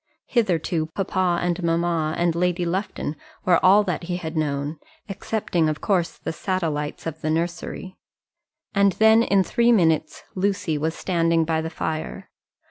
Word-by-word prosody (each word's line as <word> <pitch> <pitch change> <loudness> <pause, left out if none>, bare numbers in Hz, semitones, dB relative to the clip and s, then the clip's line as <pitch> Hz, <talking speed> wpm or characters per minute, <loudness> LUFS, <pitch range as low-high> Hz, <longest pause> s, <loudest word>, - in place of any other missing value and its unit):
Hitherto 175 -8 0
papa 185 -2 0
and 175 0 -1
mamma 165 -2 0
and 170 -1 +2
Lady 180 +1 0
Lufton 170 -3 -3 0.3
were 175 -2 +3
all 200 +3 +6
that 180 -3 -3
he 175 0 -2
had 160 -2 -6
known, 145 0 -2 0.3
excepting, 195 -5 -1
of 155 - -3
course, 180 -4 0
the - - -5
satellites 160 -5 -2
of 160 -1 -5
the 155 - -1
nursery. 170 +3 -3 0.8
And 200 -1 +4
then 220 +2 +5
in 200 -4 +3
three 235 +4 +2
minutes 160 -7 +2
Lucy 190 -4 0
was 160 +2 -1
standing 165 -2 +1
by 160 0 0
the 160 - -4
fire. 160 -1 -5
170 Hz, 150 wpm, -23 LUFS, 160-185 Hz, 0.8 s, all